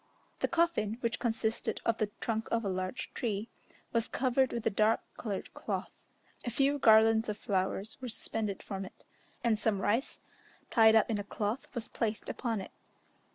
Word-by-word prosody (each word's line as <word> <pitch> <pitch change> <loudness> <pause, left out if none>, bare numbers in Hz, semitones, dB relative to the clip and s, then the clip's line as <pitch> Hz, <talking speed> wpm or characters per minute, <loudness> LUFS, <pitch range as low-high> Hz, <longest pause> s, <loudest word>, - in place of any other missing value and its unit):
The - - +2
coffin, 330 -11 +1
which 235 0 0
consisted 225 -1 -1
of 230 -1 +1
the 215 -2 +1
trunk 225 -1 -1
of 230 -1 0
a - - +1
large 185 +3 -3
tree, 220 -1 -2 0.4
was 230 -1 +2
covered 260 0 +2
with 235 -2 -3
a - - +3
dark 215 +2 +3
coloured 205 -4 -4
cloth; - - -5 0.4
a 245 - -2
few 275 +4 +2
garlands 220 -1 +6
of 210 - -2
flowers 195 +3 -2
were 250 - -4
suspended 215 -2 -3
from 195 -1 -4
it, 190 - -12 0.4
and 225 -3 +2
some 215 -2 +1
rice, 225 +8 0 0.5
tied 220 -2 +7
up 220 +1 +4
in 210 - 0
a - - -2
cloth, 210 +5 -2
was 235 -2 -2
placed 220 -2 -2
upon 230 -5 -2
it. - - -9
220 Hz, 175 wpm, -32 LUFS, 210-235 Hz, 0.5 s, tied